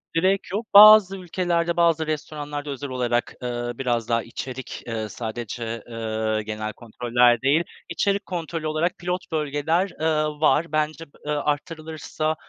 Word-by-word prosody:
direk 190 Hz, +4 st, +1 dB
yok. 210 Hz, +4 st, -2 dB
Bazı 205 Hz, -2 st, +9 dB
ülkelerde, 175 Hz, -2 st, -1 dB
bazı 165 Hz, -2 st, +3 dB
restoranlarda 150 Hz, -1 st, -4 dB
özel 140 Hz, 0 st, -5 dB
olarak, 120 Hz, -1 st, -1 dB
eee, 120 Hz, -1 st, -3 dB
biraz 120 Hz, -3 st, -1 dB
daha 115 Hz, -1 st, +1 dB
içerik, 130 Hz, +2 st, -7 dB
eee, 110 Hz, -2 st, -3 dB
sadece, 115 Hz, 0 st, -5 dB
eee, 110 Hz, -1 st, -2 dB
genel 110 Hz, 0 st, -4 dB
kontroller 120 Hz, +1 st, +2 dB
değil, 140 Hz, +5 st, +3 dB, 0.3 s
içerik 200 Hz, +4 st, 0 dB
kontrolü 165 Hz, -3 st, -4 dB
olarak 155 Hz, +3 st, 0 dB
pilot 180 Hz, +1 st, -4 dB
bölgeler, 155 Hz, +4 st, 0 dB
eee, 155 Hz, -1 st, +2 dB, 0.2 s
var. 155 Hz, 0 st, +3 dB
Bence 155 Hz, +1 st, -1 dB
b -, -, -29 dB, 0.2 s
eee, 150 Hz, -, -2 dB
arttırılırsa, 155 Hz, +1 st, -2 dB
150 Hz, 140 wpm, -24 LUFS, 120-170 Hz, 0.3 s, Bazı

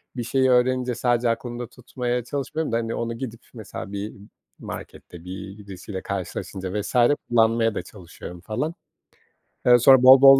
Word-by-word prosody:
bir 120 Hz, -, -2 dB
şeyi 130 Hz, +2 st, +2 dB
öğrenince 125 Hz, 0 st, +2 dB
sadece 120 Hz, 0 st, +2 dB
aklımda 120 Hz, +1 st, -3 dB
tutmaya 125 Hz, 0 st, -3 dB
çalışmıyorum 140 Hz, +3 st, -3 dB
da, 115 Hz, -, +2 dB
hani, 115 Hz, -1 st, -2 dB
onu 115 Hz, 0 st, -3 dB
gidip 115 Hz, -2 st, -6 dB
mesela 110 Hz, -2 st, -7 dB
bir 100 Hz, +1 st, -4 dB, 0.5 s
markette 85 Hz, -1 st, -9 dB
bir 95 Hz, +2 st, -7 dB
birisiyle 95 Hz, -1 st, -7 dB
karşılaşınca 95 Hz, +1 st, -4 dB
vs. 105 Hz, -, -6 dB, 0.3 s
kullanmaya 115 Hz, -1 st, +3 dB
da -, -, -1 dB
çalışıyorum 90 Hz, -2 st, -11 dB
falan. 145 Hz, -, -3 dB, 0.9 s
Eee, 125 Hz, 0 st, +7 dB
sonra 130 Hz, +1 st, +7 dB
bol 130 Hz, +1 st, +10 dB
bol 135 Hz, 0 st, +10 dB
115 Hz, 150 wpm, -24 LUFS, 100-125 Hz, 0.9 s, bol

